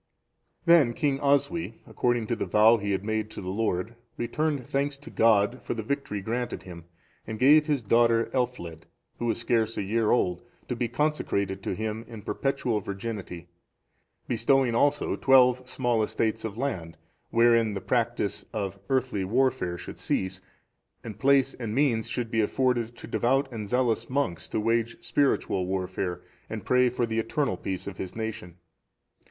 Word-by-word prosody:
Then 165 -8 +6
King 140 +1 0
Oswy, 140 -1 +1
according 120 -2 0
to 120 - -1
the - - -3
vow 110 +2 +6
he 100 -1 -4
had 95 -1 0
made 110 0 -2
to - - -9
the 90 0 -4
Lord, 105 0 -1 0.2
returned 140 +3 -1
thanks 140 +2 -1
to 145 +4 -12
God 110 +2 +3
for - - -4
the 110 - -4
victory 125 -5 -3
granted 120 +4 -3
him, 85 -2 -10 0.4
and 110 - -4
gave 150 +5 +6
his 145 -5 0
daughter 115 +1 +3
Elfled,(438) 120 -11 -2 0.4
who 120 - -2
was 115 - +1
scarce 115 -1 0
a - - -1
year 110 +2 +1
old, 90 -7 +1 0.3
to 125 - -1
be 120 0 -1
consecrated 115 -8 -1
to - - -3
Him 110 +1 -3
in 110 -3 -10
perpetual 130 -3 -1
virginity; 100 -3 -6 0.8
bestowing 135 -3 +2
also 145 +4 +2
twelve 130 -1 +4
small 120 -4 +1
estates 110 +1 -1
of 110 -1 -5
land, 90 -12 -3 0.3
wherein 115 -2 +4
the - - -2
practice 120 -2 -1
of 100 -3 -4
earthly 130 -7 0
warfare 115 -4 +1
should - - -9
cease, 95 0 -2 0.6
and 110 -3 -8
place 135 +1 +4
and 115 -3 -5
means 125 -6 +2
should 120 -2 -3
be 115 - +2
afforded 120 +1 0
to - - -9
devout 135 +4 +1
and 110 -4 -6
zealous 120 -2 +1
monks 130 -10 -2
to - - -1
wage 115 +1 0
spiritual 100 -9 +1
warfare, 95 -1 -3 0.3
and - - -6
pray 125 0 +4
for 120 0 -1
the 115 0 -1
eternal 115 0 0
peace 95 +1 -4
of 100 -1 -7
his 95 - -6
nation. 110 -6 -5
115 Hz, 165 wpm, -27 LUFS, 105-130 Hz, 0.8 s, Then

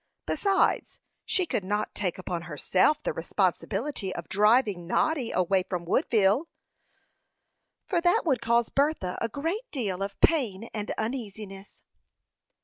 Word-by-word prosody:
Besides, 395 -1 +1 0.3
she 370 - +1
could 215 - -2
not 210 +3 -2
take 185 -4 -2
upon 180 -2 -4
herself 180 - +1
the - - -1
responsibility 195 - -1
of - - -6
driving 210 -3 +3
Noddy 265 - +1
away 185 +1 +2
from 180 -2 -4
Woodville, 220 - +2 1.4
for 350 -4 0
that 350 0 +3
would 270 -8 +1
cause 235 0 +2
Bertha 280 -11 0
a 230 - 0
great 335 - -3
deal 200 -9 -2
of 200 0 -4
pain 230 - +1
and 210 -1 -4
uneasiness. 215 -4 -6
215 Hz, 130 wpm, -27 LUFS, 190-280 Hz, 1.4 s, driving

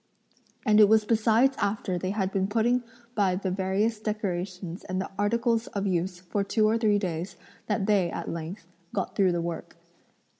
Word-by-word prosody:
And 215 -2 +5
it 210 -1 +8
was 220 -1 +5
besides 230 +4 +3
after 200 -2 -1
they 185 - -2
had 195 -1 -1
been 195 -1 0
putting 235 +4 +2 0.3
by 195 -5 +2
the 190 0 -2
various 195 +4 0
decorations 185 -4 -3
and 185 0 -2
articles 230 +3 +1
of 200 -1 -3
use 180 -1 -1
for 200 +3 -1
two 215 +2 +2
or 225 +2 +2
three 210 -2 +3
days, 180 -2 -3 0.3
that 210 -2 0
they, 195 -4 +3
at - - -5
length, 165 +3 -5 0.3
got 195 - -2
through 190 -2 +4
the 170 - 0
work. 170 -1 -6
200 Hz, 175 wpm, -27 LUFS, 185-215 Hz, 0.3 s, it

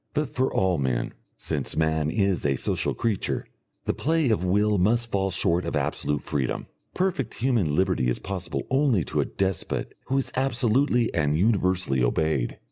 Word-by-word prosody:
But 150 0 -1
for 130 +1 +1
all 95 -4 +1
men, 65 -3 -1 0.2
since - - -3
man 80 -1 +1
is 100 0 +1
a 70 -2 +2
social - - -1
creature, 110 -4 -1 0.4
the - - 0
play 160 -4 +1
of 105 - +1
will 105 +2 +2
must 115 +5 +2
fall 95 -1 +1
short 90 -1 +1
of - - -3
absolute 75 -1 -1
freedom. 65 -4 -2 0.3
Perfect 175 - -1
human 115 - +1
liberty 90 -9 +2
is - - 0
possible 90 -7 -4
only 135 - +3
to - - -1
a - - -1
despot 95 -3 -2
who 135 - +1
is 135 - -1
absolutely 125 -1 +2
and 75 -2 +1
universally 90 - +2
obeyed. 65 0 0
95 Hz, 165 wpm, -25 LUFS, 80-120 Hz, 0.4 s, only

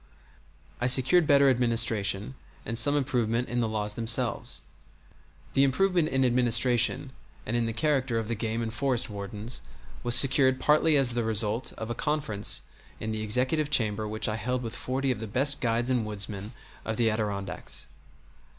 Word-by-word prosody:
I 125 - 0
secured 135 +6 +4
better 140 -1 +5
administration, 115 -4 +1 0.3
and 115 - -4
some 145 +6 +2
improvement 125 -3 -1
in 120 - -2
the 115 - 0
laws 105 -1 -2
themselves. 115 -10 +1 0.9
The 135 - +3
improvement 175 +3 +1
in 135 0 +1
administration, 120 +2 +2 0.3
and 115 - -3
in 120 -1 0
the - - -2
character 135 -2 0
of 115 -1 -3
the 115 - -2
game 115 +1 -3
and 110 -1 -5
forest 125 -1 -1
wardens, 105 +4 -5 0.4
was 120 0 +4
secured 130 0 +5
partly 150 0 +3
as 130 -3 +2
the 120 0 -1
result 110 +2 -1
of 110 +1 -6
a - - -1
conference 140 -6 -1 0.4
in 110 - -4
the 110 0 -3
executive 130 +8 0
chamber 110 -6 0
which 110 +1 -1
I 110 0 -2
held 125 +4 -3
with 115 - -5
forty 135 +1 -2
of 125 - -3
the 110 - -5
best 140 +7 +2
guides 120 +1 0
and 125 -3 +1
woodsmen 105 0 -5 0.3
of 110 -1 -4
the 115 -2 +2
Adirondacks. 100 -4 -4
120 Hz, 170 wpm, -27 LUFS, 110-130 Hz, 0.9 s, better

